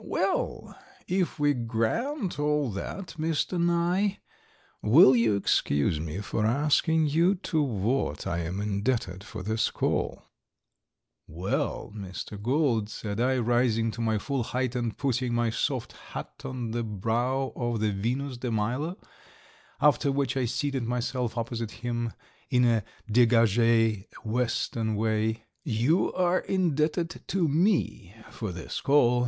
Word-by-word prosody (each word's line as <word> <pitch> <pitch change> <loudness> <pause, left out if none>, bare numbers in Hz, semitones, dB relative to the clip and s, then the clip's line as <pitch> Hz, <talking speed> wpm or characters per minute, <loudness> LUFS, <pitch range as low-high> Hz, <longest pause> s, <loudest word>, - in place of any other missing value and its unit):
"Well, - - -1 0.3
if 185 -1 0
we 145 -1 +3
grant 140 - -1
all 150 -3 +1
that, 180 - -5
Mr. 165 +2 0
Nye, 175 +4 +1 0.6
will 130 +3 +7
you 115 -3 +3
excuse 75 -6 +1
me 80 +5 -4
for 105 +1 -2
asking 150 +6 +3
you 165 +6 +3
to 170 -4 -1
what 115 - -1
I 85 -3 -1
am 85 +3 -3
indebted 100 -1 -1
for 90 - -7
this 110 +3 +1
call?" - - -1 1.0
"Well, 90 +5 -2
Mr. 100 +1 -7
Gould," 120 -3 +1
said 105 -1 -5
I, 130 +1 +2
rising 120 -1 +2
to 115 - -6
my 110 -1 +1
full 135 +4 -2
height 125 +1 -2
and 120 -3 -2
putting 125 -3 0
my 120 -1 +1
soft - - -1
hat - - -9
on 125 -3 -4
the 120 +1 -1
brow 115 +6 -1
of 120 -2 -1
the 105 0 +1
Venus 125 +7 -2
de 125 0 -3
Milo, 125 - -1 0.8
after 145 -1 +4
which 140 0 0
I 130 -2 +1
seated 130 +3 -1
myself 120 0 -2
opposite 115 -1 -3 0.2
him 120 -1 -1 0.4
in 125 0 +4
a 115 -3 +3 0.2
degage 115 -2 +4 0.2
Western 115 -1 -1
way, 110 +1 0 0.2
"you 130 - +2
are 180 0 +2
indebted 165 -2 0
to 180 -2 +1
me 155 - +1 0.2
for 110 -4 -4
this 90 +1 -5
call. 125 -4 +4
120 Hz, 135 wpm, -28 LUFS, 110-145 Hz, 1.0 s, will